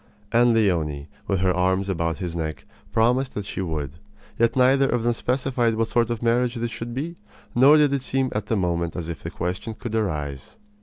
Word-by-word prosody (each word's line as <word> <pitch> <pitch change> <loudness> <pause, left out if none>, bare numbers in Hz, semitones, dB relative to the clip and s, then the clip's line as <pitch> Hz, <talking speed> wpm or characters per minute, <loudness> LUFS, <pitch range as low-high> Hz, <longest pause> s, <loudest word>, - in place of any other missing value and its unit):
And 120 0 +4
Leonie, 80 -9 0 0.2
with 95 -2 0
her 95 -1 +3
arms 95 +2 +1
about 85 -4 -1
his 85 0 -4
neck, 80 -2 -4 0.3
promised 125 +4 +2
that 105 - -3
she 100 - -4
would. 80 -3 -4 0.4
Yet 115 0 +3
neither 135 +1 +4
of 120 -2 0
them 120 0 +2
specified 125 -1 0
what 115 0 0
sort 120 -1 +2
of 115 0 -3
marriage 120 +1 +2
this 120 0 -3
should 120 +1 -6
be, 165 +6 -4 0.4
nor 135 +5 +7
did 145 -2 +4
it 140 - 0
seem 130 0 -1
at 105 -1 -3
the 115 - +1
moment 85 -3 -1
as 85 -2 -4
if 80 -4 -6
the - - -5
question 90 +5 -4
could 120 0 -6
arise. 75 - -3
110 Hz, 205 wpm, -24 LUFS, 85-120 Hz, 0.4 s, nor